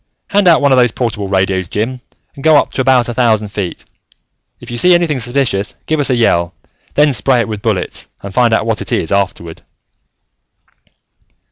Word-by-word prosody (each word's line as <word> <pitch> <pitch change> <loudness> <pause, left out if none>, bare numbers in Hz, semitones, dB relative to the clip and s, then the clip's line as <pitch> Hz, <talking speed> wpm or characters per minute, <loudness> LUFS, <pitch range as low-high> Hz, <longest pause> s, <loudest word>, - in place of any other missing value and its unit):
Hand 200 -2 +2
out 165 -3 +5
one 140 - +3
of 130 - +4
the 120 -2 +2
portable 105 -5 -3
radios, 95 -1 0
Jim 125 +7 -3 0.3
and 140 - -12
go 160 -1 +5
up - - 0
to - - -1
about 130 -2 +3
a 120 - -4
thousand 110 -3 +1
feet. 100 -4 -5 0.7
If 120 0 -11
you 120 - -4
see 180 +5 +5
anything 165 -6 0
suspicious, 120 -5 -1
give 155 -1 -1
us 145 - +3
a 130 - +2
yell, 85 -8 +1 0.4
then 145 -1 +3
spray 125 0 +3
it - - -3
with 105 -2 -6
bullets, - - -3 0.2
and 100 -1 -8
find 120 0 +2
out 110 - +1
what 115 -2 -2
it - - -6
is 80 - -1
afterward." 95 -4 -2
120 Hz, 195 wpm, -14 LUFS, 100-135 Hz, 0.7 s, out